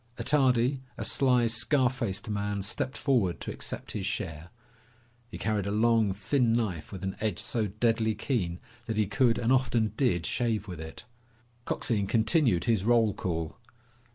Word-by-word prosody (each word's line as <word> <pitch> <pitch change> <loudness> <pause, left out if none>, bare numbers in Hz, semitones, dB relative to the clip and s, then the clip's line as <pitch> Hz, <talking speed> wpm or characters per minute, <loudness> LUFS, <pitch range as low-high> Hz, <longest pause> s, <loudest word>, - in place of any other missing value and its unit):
Attardi, 130 -2 +2 0.2
a - - -3
sly, 125 -3 +3
scar 120 +4 +2
faced 115 -7 -3
man, 100 -1 -2
stepped 130 +6 -3
forward 115 - +1
to - - -4
accept - - -5
his 100 -2 -3
share. 85 -5 -4 0.8
He - - -7
carried 105 -3 -1
a - - -1
long, 110 -1 +3
thin 115 +5 +1
knife 95 -10 -2
with 95 -1 -7
an 95 0 -3
edge 105 -5 0
so 110 -1 -1
deadly 110 +1 +1
keen 100 -7 -2 0.3
that 110 -2 -2
he 105 - +3
could 115 +4 +2
and 120 +2 +2
often 120 -4 +1
did 100 - +1
shave 110 +2 -1
with 90 -4 -7
it. 80 +7 -8 0.6
Coxine 105 -4 0
continued 110 - +2
his 110 -5 +1
roll 115 -2 +3
call. 80 -3 -3
110 Hz, 160 wpm, -29 LUFS, 100-120 Hz, 0.8 s, sly